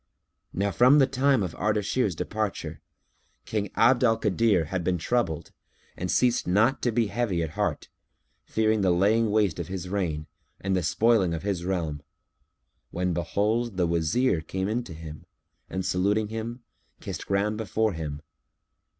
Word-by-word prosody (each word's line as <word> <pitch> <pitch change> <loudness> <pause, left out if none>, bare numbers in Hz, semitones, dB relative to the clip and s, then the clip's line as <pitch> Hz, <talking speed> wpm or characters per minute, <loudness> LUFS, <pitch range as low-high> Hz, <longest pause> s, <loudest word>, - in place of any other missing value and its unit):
Now 100 +2 -1
from 125 - +6
the 140 - +6
time 135 -3 +2
of 90 -3 -4
Ardashir's 105 0 0
departure, 95 -4 -3 0.6
King 105 -2 -2
Abd 125 +2 +4
al 115 -2 +4
Kadir 105 -4 +2
had 90 +3 -3
been 90 +1 +1
troubled 85 -4 -1 0.4
and 90 +2 -4
ceased 125 +3 +2
not 110 +9 +3
to 120 - +1
be 115 +1 +2
heavy 100 -6 -1
at 80 - -4
heart, - - -2 0.6
fearing 110 -1 +1
the 95 - +3
laying 105 +6 +3
waste 105 -6 +1
of 85 - -4
his 90 -1 -5
reign 85 -6 -2 0.3
and 95 0 -1
the 90 - +1
spoiling 100 -1 +2
of 80 - -6
his 95 -4 -2
realm; 80 -6 -2 0.9
when 90 0 -1
behold, 105 +6 -1
the 90 - +2
Wazir 85 +5 +1
came 95 +4 -3
in 115 +4 -1
to 85 - -9
him 80 -1 -10 0.4
and 95 -1 -3
saluting 105 +4 +1
him, 115 +2 -5 0.4
kissed - - -6
ground 100 +2 0
before 110 -1 0
him. 75 -2 -5
100 Hz, 160 wpm, -26 LUFS, 85-115 Hz, 0.9 s, from